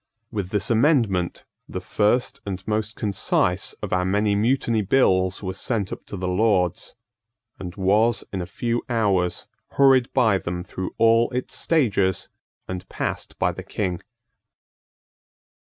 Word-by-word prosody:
With 100 -5 -3
this 105 +2 -1
amendment, 115 - +2 0.3
the - - -4
first 110 +4 0
and 95 -1 -6
most 110 0 -1
concise 100 -2 0
of 100 - -3
our 90 0 +2
many 100 +3 +1
Mutiny 115 +1 +1
Bills 95 -4 +2
was 95 0 -4
sent 105 -6 -1
up - - -10
to 100 - -6
the 90 0 -3
Lords, 90 0 +1 0.6
and 90 -1 -7
was, 105 +4 +2
in 95 - -2
a 85 - -5
few 120 +5 -2
hours, 100 -7 +1 0.3
hurried 135 -3 +4
by 110 -7 +3
them 90 0 -4
through 95 0 -6
all 115 +1 +4
its 125 +1 -4
stages 100 - +1 0.4
and 90 -1 -6
passed - - -4
by - - +1
the - - -8
King. 90 -4 -3
105 Hz, 140 wpm, -23 LUFS, 95-115 Hz, 0.6 s, hurried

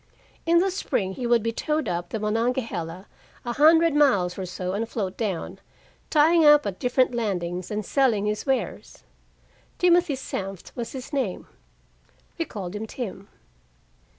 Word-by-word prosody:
In 340 +1 +5
the 380 +3 +3
spring 195 - -2
he 245 +4 -3
would 235 -2 +3
be 230 - 0
towed 300 +3 -1
up 175 0 -3
the 220 - -3
Monongahela 210 -5 -2 0.4
a 240 - -2
hundred 325 +3 +5
miles 205 -12 +3
or 190 -1 -5
so 180 +1 -4
and 225 +3 -2
float 195 -6 -3
down, 200 -7 -3 0.5
tying 320 +2 +5
up 295 -1 +7
at 195 -2 -4
different 250 0 +2
landings 180 -6 -2
and 210 -1 -3
selling 240 -7 +2
his 210 0 -1
wares. 265 -1 -2 0.7
Timothy 350 -4 +3
Senft 195 -7 -6
was 235 -2 -5
his 265 +2 -8
name. 255 -10 -2 0.9
We 330 - 0
called 195 - -6
him 220 +2 -4
Tim. 200 -5 -6
230 Hz, 150 wpm, -25 LUFS, 195-280 Hz, 0.9 s, up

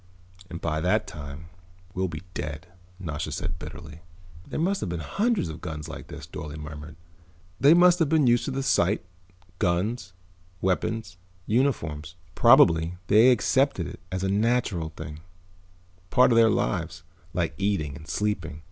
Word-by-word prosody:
"And 85 -1 -6
by 80 -2 -1
that 90 +3 +2
time 75 +2 -9 0.4
we'll 95 0 -1
be 80 -1 -7
dead," 75 +2 -5 0.3
Nasha 80 -4 -4
said 80 +1 -4
bitterly. 80 +1 -9 0.5
"There - - -4
must 190 +5 +1
have - - -2
been 85 -1 -3
hundreds 210 - 0
of 80 - -7
guns 75 -3 -6
like 80 - -8
this," - - -9
Dorle 75 0 -7
murmured. 75 +1 -8 0.6
"They 145 +4 +7
must 175 0 +6
have 160 -4 +2
been 155 -2 +4
used 120 0 +3
to - - -2
the 135 0 -2
sight, 95 -8 +2 0.5
guns, 90 +2 -1 0.5
weapons, 95 +1 -1 0.3
uniforms. 90 - 0 0.2
Probably 85 +2 +5
they 110 +5 +7
accepted 130 -3 +2
it - - -8
as 95 0 -2
a - - +1
natural 105 -5 +1
thing, 75 -1 -8 0.9
part 125 - +5
of - - +4
their 115 -1 +6
lives, 90 -7 -1 0.3
like 85 -2 0
eating 95 -8 0
and 80 +1 -11
sleeping. 85 -8 -2
90 Hz, 155 wpm, -26 LUFS, 80-115 Hz, 0.9 s, They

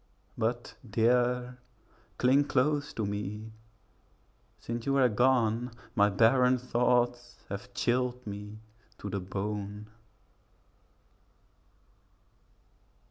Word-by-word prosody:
But, 120 +2 -2 0.2
dear, 125 +2 +1 0.6
cling 135 +3 +4
close 145 +2 +1
to 110 - -2
me; 105 +2 -4 1.1
since 120 +1 -5
you 135 - +2
were 135 -2 +4
gone, 120 0 +2 0.2
My 100 0 +4
barren 125 +5 +4
thoughts 120 0 0
have 100 0 -6
chilled 125 +1 0
me 105 +1 -7 0.4
to 100 - -6
the 100 - -1
bone. 105 +2 -5
120 Hz, 85 wpm, -30 LUFS, 105-125 Hz, 1.1 s, cling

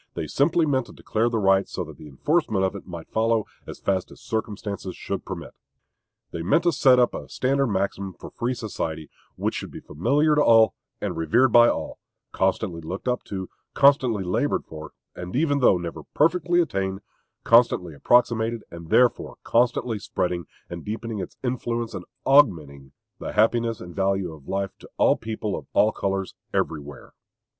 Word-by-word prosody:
They - - -3
meant - - -7
simply 165 +4 +3
to 130 -5 0
declare 115 +2 -1
the 115 - -1
right, 95 -2 +3
so 90 - -3
that 80 -3 -11
the 75 - -11
enforcement 110 - +1
of 95 - -2
it 100 - -9
might 85 -2 -9
follow 110 -1 +1 0.2
as - - -7
fast 95 -2 -1
as - - -14
circumstances 105 -3 -4
should - - -5
permit. - - -7 0.8
They 85 - -5
meant 95 - +2
to 175 - +3
set 130 -5 +5
up 125 -1 +3
a - - -7
standard 135 +1 +1
maxim 100 -2 -2
for - - -11
free 125 +2 -2
society, 80 - -5 0.2
which - - -1
should - - -5
be - - -9
familiar 145 - +1
to 150 0 +4
all, 115 -3 +6 0.3
and - - -2
revered 115 +11 +3
by 120 +1 +7
all; - - -4 0.3
constantly 95 -2 -1
looked 90 +9 -6 0.2
to, 95 -2 -5 0.3
constantly 130 -7 +4
labored 90 0 0
for, 80 -1 -10 0.2
and 90 +3 -7
even 145 0 +2
though 120 -8 +5
never 85 -1 -6
perfectly 175 +3 +3
attained, 95 - -2 0.4
constantly 115 -8 +4
approximated, 115 +5 +2
and 85 -1 -10
thereby 125 -1 +3
constantly 120 -1 +1
spreading 90 -2 -2 0.2
and 85 -1 -7
deepening 110 0 -4
its 95 - -7
influence 120 -2 -2
and - - -6 0.2
augmenting; 80 - +3 0.3
the - - -5
happiness 115 +1 +2
and 90 -1 -10
value 95 -3 0
of 75 -3 -15
life 95 0 -2
to - - -14
all - - +4
people 110 -2 -4
of - - -8
all 110 - +4
colors 95 -2 -2 0.2
everywhere. 75 -1 -3
105 Hz, 170 wpm, -24 LUFS, 90-120 Hz, 0.8 s, by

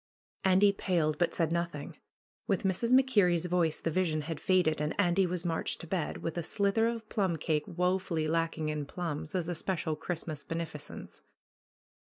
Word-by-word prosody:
Andy 190 +2 +5
paled, 165 -6 0
but 175 - +2
said 165 -2 0
nothing. 170 -3 -3 0.5
With 200 -5 +1
Mrs. 195 +5 +1
MacKer 255 -7 +5
rie's 175 -1 +1
voice 175 -3 +1
the 165 - -2
vision 160 -3 +1
had 155 +1 -5
faded, 175 -5 +2
and 150 +5 -2
Andy 185 0 +3
was 175 -1 -3
marched 165 -2 -1
to - - -8
bed, 170 -2 -3
with 165 +1 -2
a - - -1
slither 200 +6 +1
of 230 -2 -3
plum 190 -6 0
cake 155 -1 -1
woefully 180 -2 0
lacking 165 -1 0
in 150 -2 -3
plums, 160 -1 -4
as 175 -3 0
a 175 - -1
special 165 -2 -1
Christmas 155 -2 -4
beneficence. 165 -3 -6
170 Hz, 170 wpm, -31 LUFS, 160-185 Hz, 0.5 s, Andy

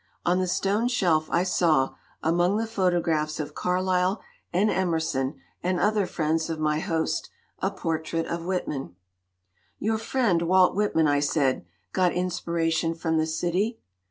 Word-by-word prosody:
On 180 +1 +3
the 185 - 0
stone 200 +5 +1
shelf 170 -10 +2
I 175 - +2
saw, 160 -7 +2 0.3
among 175 +5 +2
the 225 - 0
photographs 175 -7 0
of 150 - -4
Carlyle 185 +1 +1 0.3
and 200 +5 +2
Emerson 160 -7 -1 0.2
and 180 0 0
other 210 -2 +2
friends 160 -1 -1
of 160 -1 -3
my 155 0 +1
host, 160 -1 -1 0.3
a 190 - +1
portrait 165 -3 -2
of 170 0 -4
Whit 185 +1 -2
man. 135 -10 -5 0.8
"Your 220 +1 0
friend, 225 -7 +1
Walt 180 +2 +4
Whitman," 195 -6 +2
I 145 0 +3
said, 140 - +1 0.3
"got 180 -2 +2
inspiration 170 -2 0
from 160 -1 0
the 155 - +1
city." 180 +8 -1
175 Hz, 150 wpm, -26 LUFS, 160-185 Hz, 0.8 s, Walt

